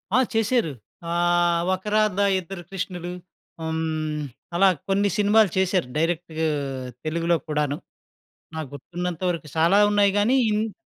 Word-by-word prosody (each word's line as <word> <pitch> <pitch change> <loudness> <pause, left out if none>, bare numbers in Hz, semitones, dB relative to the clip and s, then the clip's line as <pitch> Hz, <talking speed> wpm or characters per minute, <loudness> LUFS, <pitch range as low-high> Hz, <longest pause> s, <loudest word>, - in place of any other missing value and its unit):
ఆ! - - +6 0.2
చేశారు. 225 - +1 0.4
ఆహ్, 175 0 +2
'ఒక 185 - -4
రాధ 215 -2 +2 0.2
ఇద్దరు 180 0 -8
కృష్ణులు.' 180 -2 -4 0.5
హ్మ్, 160 -1 -2 0.3
అలా 195 +2 +5 0.2
కొన్ని 200 +1 +2
సినిమాలు 210 0 +4
చేశారు 185 -5 +2
డైరెక్ట్ 165 0 -1 0.7
తెలుగులో 170 +1 +1
కూడాను, 150 -1 0 0.8
నాకు 160 -2 -4
గుర్తున్నంత 175 +4 -5
వరకు. 170 -3 -3
చాలా 170 +5 +4
ఉన్నాయి 205 -1 +4
గానీ 215 +6 +3 0.2
ఇంత్ 215 0 -1
175 Hz, 120 wpm, -24 LUFS, 160-200 Hz, 0.8 s, ఆ